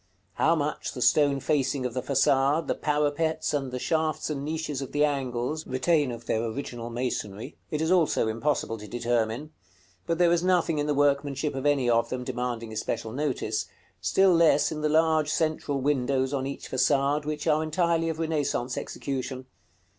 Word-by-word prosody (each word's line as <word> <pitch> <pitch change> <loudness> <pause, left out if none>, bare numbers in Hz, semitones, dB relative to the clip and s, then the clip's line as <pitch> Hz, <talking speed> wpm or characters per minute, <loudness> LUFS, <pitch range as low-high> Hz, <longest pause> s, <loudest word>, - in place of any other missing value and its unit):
How 165 - +3
much 150 -1 -2
the 125 - -6
stone 140 +3 +4
facing 135 -2 0
of 125 - -2
the 130 - -2
façade, 140 +3 +2
the - - 0
parapets, 150 +2 0
and 135 -3 -1
the 125 - -3
shafts 155 +3 -1
and 140 -2 -3
niches 155 -2 -3
of 135 - -7
the 145 +1 +4
angles, 135 +1 -2
retain 140 +1 +1
of 120 0 -8
their 110 0 0
original 120 0 -5
masonry, 115 -4 -4
it 150 - -2
is 160 - 0
also 170 -10 +3
impossible 115 0 -1
to 105 - -9
determine; 120 +4 -1 0.6
but 165 - 0
there 175 -1 +4
is 170 -1 +3
nothing 175 -4 +2
in 145 - -1
the 150 - +1
workmanship 140 0 +1
of 135 +2 -2
any 140 -4 +2
of 115 -1 +2
them 125 -1 -3
demanding 120 -3 -4
especial 110 +1 -3
notice; 110 -5 -2 0.3
still 185 - +4
less 165 -3 +4
in 155 -1 -4
the 150 - +1
large 155 -1 +3
central 155 -2 0
windows 130 -1 +1
on 135 -1 -1
each 140 - -7
façade, 140 +3 +2
which 150 0 -3
are 155 -1 +3
entirely 165 +1 +1
of 160 - -3
Renaissance 145 -6 -1
execution. 130 -1 -5
140 Hz, 175 wpm, -27 LUFS, 125-155 Hz, 0.6 s, stone